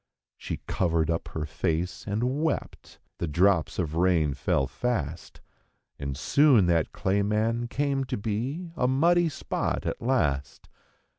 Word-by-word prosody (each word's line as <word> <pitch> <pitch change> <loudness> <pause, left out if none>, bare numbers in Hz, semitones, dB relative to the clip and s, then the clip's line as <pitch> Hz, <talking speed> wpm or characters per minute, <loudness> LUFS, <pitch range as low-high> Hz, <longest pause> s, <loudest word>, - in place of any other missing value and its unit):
She - - -6
covered 85 -3 +1
up 80 - -2
her 80 -1 -4
face 80 +6 -2
and 125 +8 -1
wept; 160 -3 -3 0.2
the 85 - -1
drops 85 +2 +2
of 80 -4 -2
rain 85 -4 +2
fell 65 0 0
fast. 85 - -3 0.6
And 70 -1 -4
soon 130 - +4
that 85 -2 +1
clay 100 +2 0
man 110 +3 0
came 135 +1 -1
to 125 0 -3
be 125 - -3
a 125 - +1
muddy 170 +6 +3
spot 145 - -3
at - - -3
last. 70 - -1
100 Hz, 140 wpm, -27 LUFS, 80-130 Hz, 0.6 s, soon